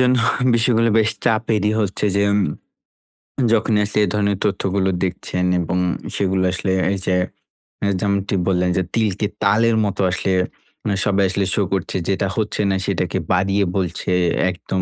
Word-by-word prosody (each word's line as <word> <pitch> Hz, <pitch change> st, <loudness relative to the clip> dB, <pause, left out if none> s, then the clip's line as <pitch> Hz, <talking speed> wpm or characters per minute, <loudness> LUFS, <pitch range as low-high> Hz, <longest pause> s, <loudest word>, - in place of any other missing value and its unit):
জন্য 125 Hz, 0 st, +4 dB, 0.4 s
বিষয়গুলো 115 Hz, -1 st, +3 dB
বেশ 110 Hz, 0 st, +3 dB
চাপেরই 110 Hz, -2 st, +1 dB
হচ্ছে 100 Hz, -1 st, -1 dB
যে, -, -, +3 dB
উম 100 Hz, -, +3 dB, 1.1 s
যখন 110 Hz, 0 st, +2 dB
আসলে 105 Hz, +1 st, 0 dB
এ -, -, -4 dB
ধরনের 100 Hz, -2 st, +1 dB
তথ্যগুলো 95 Hz, -1 st, 0 dB
দেখছেন 90 Hz, 0 st, -2 dB
এবং 85 Hz, +1 st, -1 dB, 0.4 s
সেগুলো 95 Hz, -1 st, 0 dB
আসলে 95 Hz, +1 st, -2 dB, 0.2 s
এই 100 Hz, -, -1 dB
যে, 90 Hz, -, +1 dB, 0.7 s
আ -, -, +2 dB
যেমনটি 100 Hz, -1 st, 0 dB
বললেন 90 Hz, -1 st, +1 dB
যে, 95 Hz, -, +2 dB
তিলকে 105 Hz, -3 st, 0 dB, 0.2 s
তালের 110 Hz, +3 st, +3 dB
মতো 100 Hz, -1 st, -2 dB
আসলে, 95 Hz, +1 st, -1 dB, 0.7 s
সবাই 100 Hz, -1 st, +2 dB
আসলে 100 Hz, +1 st, 0 dB
শো -, -, +1 dB
করছে 95 Hz, -3 st, -2 dB
যেটা 95 Hz, 0 st, 0 dB
হচ্ছে 105 Hz, -1 st, -1 dB
না 95 Hz, -, +1 dB
সেটাকে -, -, -1 dB
বাড়িয়ে 95 Hz, +2 st, +2 dB
বলছে 90 Hz, -2 st, -2 dB, 0.4 s
একদম 95 Hz, +1 st, -4 dB
100 Hz, 150 wpm, -20 LUFS, 95-105 Hz, 1.1 s, জন্য